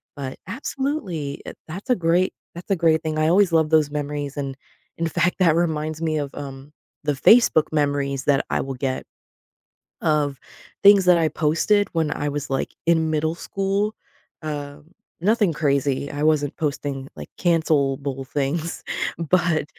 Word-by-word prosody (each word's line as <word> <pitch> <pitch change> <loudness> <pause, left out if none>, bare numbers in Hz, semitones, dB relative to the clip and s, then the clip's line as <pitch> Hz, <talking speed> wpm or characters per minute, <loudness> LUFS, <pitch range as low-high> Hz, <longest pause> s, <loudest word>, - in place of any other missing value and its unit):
But, 135 -2 -6
absolutely, 210 - -3
i - - -7
that's 185 +10 -8
a 250 - +5
great 175 +2 +2 0.2
that's 180 +3 -8
a - - +4
great 160 0 +3
thing, 155 -1 -2
I 155 - +3
always 185 +2 +4
love 160 -2 +3
those 155 -2 +3
memories, 145 -1 -4
and 135 -2 -3 0.4
in 165 - 0
fact, 175 +3 +1
that 165 -4 +4
reminds 155 -2 -1
me 160 -1 0
of, 145 -1 -3
um, 140 0 -8 0.3
the 150 - +1
Facebook 160 - +5
memories 140 -2 0
that 140 -2 +2
I - - 0
will 135 0 -5
get 130 0 -2 1.0
of 145 -3 +1 0.4
things 200 -2 +7
that 180 -1 +6
I 165 -1 +2
posted 175 +8 +2
when 160 -3 0
I 145 - -2
was, 145 -1 -4
like, 135 - -1
in 160 -1 +3
middle 155 +1 0
school. 195 +4 -1 0.5
Uh, 145 -1 -5 0.4
nothing 205 -2 +2
crazy. 140 -2 0
I 145 0 -5
wasn't 150 -2 +2
posting, 140 -3 -3
like, - - -8
cancel-able 140 -5 +1
things, 150 +5 -2 0.3
but, 170 -1 +1
155 Hz, 160 wpm, -23 LUFS, 145-170 Hz, 1.0 s, things